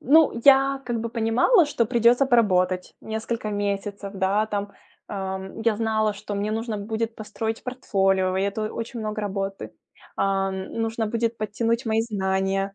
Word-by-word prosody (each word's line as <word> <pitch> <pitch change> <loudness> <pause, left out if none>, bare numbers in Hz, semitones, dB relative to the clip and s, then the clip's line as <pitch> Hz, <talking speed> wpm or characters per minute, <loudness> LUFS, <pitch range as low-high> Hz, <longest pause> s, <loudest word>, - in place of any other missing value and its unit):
ну, 290 -2 +4
я 275 0 +5
как 240 -2 -2
бы 230 - -3
понимала, 235 - +3
что 235 -6 0
придется 240 +3 +4
поработать 185 -7 +2
несколько 220 0 -4
месяцев, 200 0 -3
да, 195 +2 +1
там. 205 -1 -3 0.4
Ам, 190 +1 -5
я 225 -2 +2
знала, 220 -1 +1
что 205 0 -6
мне 205 +1 -1
нужно 225 0 -2
будет 220 +2 -3
построить 220 +1 -4
портфолио, 195 -7 +1
и 190 - +1
это 215 +2 -2
очень 230 +1 -5
много 215 0 -3
работы. 195 - -4 0.4
Ам, 195 -1 0
нужно 225 0 -1
будет 230 +1 -1
подтянуть 230 +3 -1
мои 220 0 +2
знания 195 -2 -1
215 Hz, 150 wpm, -24 LUFS, 195-230 Hz, 0.4 s, я